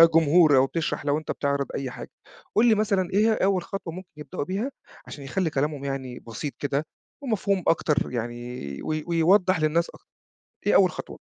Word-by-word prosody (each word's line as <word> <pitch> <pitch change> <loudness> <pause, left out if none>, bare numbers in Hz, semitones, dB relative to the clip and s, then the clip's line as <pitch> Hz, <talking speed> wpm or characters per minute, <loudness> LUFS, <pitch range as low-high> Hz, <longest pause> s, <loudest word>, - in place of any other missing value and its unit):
جمهور 160 -2 +6
أو 130 - +5
بتشرَح 155 -1 -3
لو 145 +1 +2
أنت 155 - -4
بتعرِض 140 -1 -1
أي 135 -2 -3
حاجة، - - -9 0.4
قل 220 - +5
لي 220 - +5
مثلًا 200 -4 +1
إيه 200 - +3
هي 225 - +4
أول 190 -3 +1
خطوة 175 -3 -6
ممكن 185 0 -9
يبدئوا 145 -1 -5
بيها 205 - -3 0.4
عشان 145 - -9
يخلّي 170 +4 -1
كلامهم 145 0 -2
يعني 130 -2 -4
بسيط 120 +5 -6
كده 145 +2 -1 0.4
ومفهوم 200 -7 0
أكتر 150 -5 +1
يعني 120 - -5
و - - -7
و 155 - -2
ويوضّح 180 +2 +3
للناس 165 +2 +2
أك - - -14 0.7
إيه - - +4
أول - - +6
خطوة؟ - - -8
155 Hz, 185 wpm, -25 LUFS, 140-185 Hz, 0.7 s, جمهور